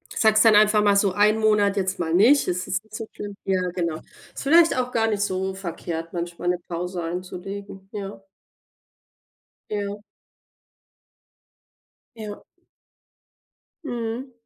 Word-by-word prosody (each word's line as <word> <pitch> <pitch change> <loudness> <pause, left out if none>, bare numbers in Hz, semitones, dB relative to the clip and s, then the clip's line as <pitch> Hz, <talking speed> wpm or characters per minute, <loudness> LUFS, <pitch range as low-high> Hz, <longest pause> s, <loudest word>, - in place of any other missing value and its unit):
Sagst 215 -1 +4
dann 225 -2 +6
einfach 210 0 +5
mal 205 -1 +4
so 200 -2 +3
1 210 +2 +4
Monat 210 -2 +3
jetzt 190 -1 -1
mal 165 -2 -1
nicht, 235 +11 +5
es 180 0 -1
ist 190 - -2
nicht 220 0 -13
so 225 0 -5
schlimm, 205 -1 -7
ja 190 -1 +1
genau. 170 -3 -1 0.4
Ist - - -7
vielleicht 330 +4 +5
auch 250 0 -1
gar 225 -2 +1
nicht 210 -2 0
so 190 -1 -1
verkehrt 170 -3 -5
manchmal 175 0 -4
'ne 180 - +1
Pause 175 +1 -4
einzulegen, 190 +3 -6
ja. 200 -1 -6 1.5
Ja. 205 -1 -3 2.2
Ja. 210 -2 -7 1.4
Mhm. 240 0 -4
200 Hz, 135 wpm, -24 LUFS, 180-215 Hz, 2.2 s, dann